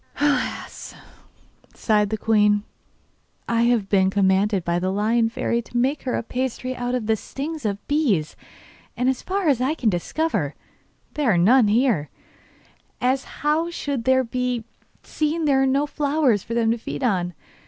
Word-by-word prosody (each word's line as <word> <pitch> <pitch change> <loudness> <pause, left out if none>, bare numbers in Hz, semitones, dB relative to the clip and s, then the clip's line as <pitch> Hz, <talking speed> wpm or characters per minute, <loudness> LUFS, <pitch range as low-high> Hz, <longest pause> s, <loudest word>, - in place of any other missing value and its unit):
'Alas,' 290 -1 -1 0.8
sighed 210 -2 +1
the 220 - -2
queen, 210 -2 +3 0.8
'I 230 0 +1
have 235 -5 +2
been 190 -2 +3
commanded 195 -1 +2
by 170 0 0
the 185 +1 -1
Lion 225 +3 +1
Fairy 235 +1 -1
to 240 - -6
make 270 +4 +1
her 255 - -1
a - - -2
pasty 255 +1 -3
out 245 0 -2
of 245 -3 -2
the 220 0 +2
stings 290 +6 -6
of 200 0 -5
bees, 240 - +1 0.6
and, 250 +1 +2
as 265 - -1
far 385 -1 -2
as 270 -5 +3
I 275 +5 +1
can 230 -8 +1
discover, 175 - -1 0.6
there 290 -6 +1
are - - +2
none 225 +7 +5
here; 215 - +2 0.9
as 260 +2 +1 0.2
how 315 +3 +2
should 280 -8 -4
there 260 0 +4
be, 250 -1 -2 0.4
seeing 310 +1 -1
there 275 -2 +3
are 270 - +3
no 275 +2 +2
flowers 285 -7 +1
for 230 - -5
them 225 -1 +2
to 235 - -1
feed 245 - -5
on? 180 -7 0
240 Hz, 165 wpm, -23 LUFS, 210-275 Hz, 0.9 s, none